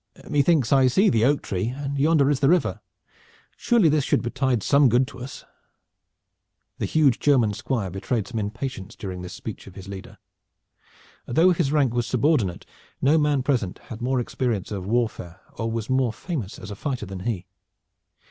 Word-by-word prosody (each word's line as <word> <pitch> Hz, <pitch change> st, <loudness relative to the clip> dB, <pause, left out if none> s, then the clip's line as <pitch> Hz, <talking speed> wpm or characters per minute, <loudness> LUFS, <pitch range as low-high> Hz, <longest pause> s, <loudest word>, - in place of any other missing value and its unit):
"Methinks 145 Hz, -3 st, +2 dB
I 135 Hz, -1 st, +5 dB
see 195 Hz, -, +4 dB
the 115 Hz, -2 st, +2 dB
oak 145 Hz, +2 st, +2 dB
tree, 95 Hz, +2 st, -2 dB
and 140 Hz, +3 st, -4 dB
yonder 145 Hz, -1 st, +4 dB
is 140 Hz, -, 0 dB
the 135 Hz, -, +3 dB
river. 180 Hz, +1 st, +1 dB, 0.7 s
Surely 235 Hz, -8 st, +3 dB
this 150 Hz, -2 st, +2 dB
should -, -, +1 dB
betide 125 Hz, -2 st, 0 dB
some 140 Hz, -2 st, +5 dB
good 125 Hz, +3 st, +3 dB
to -, -, -12 dB
us." 125 Hz, +2 st, -8 dB, 1.3 s
The -, -, -1 dB
huge 145 Hz, -6 st, +3 dB
German 125 Hz, -8 st, +3 dB
Squire 100 Hz, -3 st, -2 dB
betrayed 105 Hz, +3 st, -2 dB
some 115 Hz, -3 st, -4 dB
impatience 110 Hz, -1 st, -5 dB
during 95 Hz, -3 st, -6 dB
this 90 Hz, +1 st, -7 dB
speech 110 Hz, -, -8 dB
of 95 Hz, -, -12 dB
his 95 Hz, -1 st, -10 dB
leader. 100 Hz, -1 st, -9 dB, 1.1 s
Though 165 Hz, +9 st, +4 dB
his 145 Hz, -5 st, 0 dB
rank 140 Hz, -6 st, +2 dB
was 120 Hz, -1 st, -1 dB
subordinate, 125 Hz, -, +1 dB, 0.3 s
no 150 Hz, +4 st, +4 dB
man 145 Hz, -3 st, +1 dB
present 120 Hz, -9 st, 0 dB
had 115 Hz, +1 st, -10 dB
more 130 Hz, +1 st, 0 dB
experience 120 Hz, -5 st, -2 dB
of 95 Hz, -2 st, -4 dB
warfare 110 Hz, -6 st, -2 dB
or 115 Hz, 0 st, -3 dB
was 115 Hz, -1 st, -3 dB
more 130 Hz, -2 st, +1 dB
famous 120 Hz, -, -5 dB
as 100 Hz, -, -9 dB
a -, -, -5 dB
fighter 130 Hz, -1 st, -3 dB
than 95 Hz, -1 st, -7 dB
he. 95 Hz, -3 st, -3 dB
125 Hz, 175 wpm, -24 LUFS, 105-140 Hz, 1.3 s, I